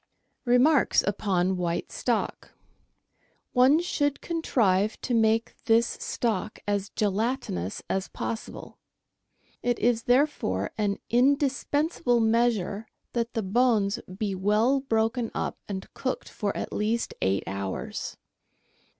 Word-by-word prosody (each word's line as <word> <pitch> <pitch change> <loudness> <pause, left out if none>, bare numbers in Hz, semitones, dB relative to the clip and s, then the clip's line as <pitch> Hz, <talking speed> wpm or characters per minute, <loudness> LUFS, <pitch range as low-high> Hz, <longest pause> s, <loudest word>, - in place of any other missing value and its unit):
Remarks 255 +4 +4
upon 190 -2 0
White 170 -1 -2
Stock. - - -2 0.5
— - - -43
One 275 +5 +6
should 290 -5 0
contrive 215 - +1
to 250 - -2
make 225 0 +2
this 230 +1 +5
stock 220 -3 -2
as 205 -1 0
gelatinous 205 - -2
as 190 0 -1
possible. 230 - -6 0.8
It 245 -1 0
is 230 -1 +1
therefore 245 - +1
an 205 -2 0
indis 275 +3 +2
pensable 290 -5 +2
measure 225 -2 +1 0.3
that 235 0 -1
the 225 - 0
bones 215 -1 +2 0.2
be 205 -1 -1
well 210 +8 +2
broken 225 -2 0
up - - -3
and 190 -1 -4
cooked 260 - -3
for 205 -2 -3
at - - -4
least 220 +3 -1
eight 95 +1 +1
hours. 95 0 -4
225 Hz, 115 wpm, -27 LUFS, 200-245 Hz, 0.8 s, One